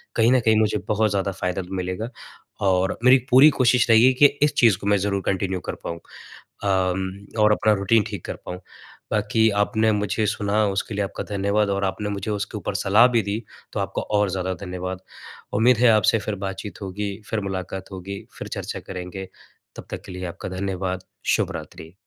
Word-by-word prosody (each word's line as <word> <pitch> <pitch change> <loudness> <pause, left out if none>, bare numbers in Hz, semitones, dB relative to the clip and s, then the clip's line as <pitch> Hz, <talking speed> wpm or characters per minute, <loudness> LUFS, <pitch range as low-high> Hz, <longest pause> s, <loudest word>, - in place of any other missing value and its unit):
कहीं 115 +1 +4
न 130 - +5
कहीं 110 0 +5
मुझे 105 -1 +2
बहुत 110 0 +2
ज़्यादा 100 0 -1
फ़ायदा 90 0 -2
मिलेगा 95 +5 -3 0.6
और 95 0 +2
मेरी 130 +1 +7
पूरी 135 +5 +8
कोशिश 125 -4 +3
रहेगी 115 +3 +6
कि 130 +3 +5 0.2
इस 150 - +3
चीज़ 115 -6 +5
को 100 - -6
मैं 100 0 +4
ज़रूर 100 0 -1
कन्टिन्यू 95 -1 -1
कर - - -2
पाऊँ 85 0 -5 0.7
अम 95 -1 +1 0.3
और 105 - +5
अपना 110 0 +3
रूटीन 105 +2 +3
ठीक 100 -4 -7
कर - - -4
पाऊँ। 90 0 -6 0.5
बाकी 110 +1 +2
आपने 110 +1 +2
मुझे 105 +1 0
सुना, 105 0 +1
उसके 100 +2 -2
लिए 100 - 0
आपका - - -6
धन्यवाद 100 +1 +1
और 100 0 0
आपने 105 +2 -2
मुझे 100 +1 -3
उसके 105 +1 -3
ऊपर 100 - -4
सलाह 105 +5 +5
भी 115 - +5
दी, 105 +3 -3 0.3
तो - - -2
आपका - - -3 0.2
और 105 -2 +2
ज़्यादा 95 0 -2
धन्यवाद। 90 0 -5 0.5
उम्मीद 120 +3 +4
है, 120 +1 +5
आपसे 110 0 +4
फिर 105 0 -3
बातचीत 95 0 -7
होगी, 100 +1 -4 0.2
फिर 110 - 0
मुलाकात 95 +1 -5
होगी, 95 +2 -7
फिर - - -6
चर्चा - - -5
करेंगे, 95 0 -7 0.5
तब - - -10
तक - - -5
के - - -9
लिए 90 0 -5
आपका 85 +2 -6
धन्यवाद। 95 -1 -3 0.3
शुभ - - -1
रात्रि। 80 +2 -9
100 Hz, 190 wpm, -23 LUFS, 95-110 Hz, 0.7 s, पूरी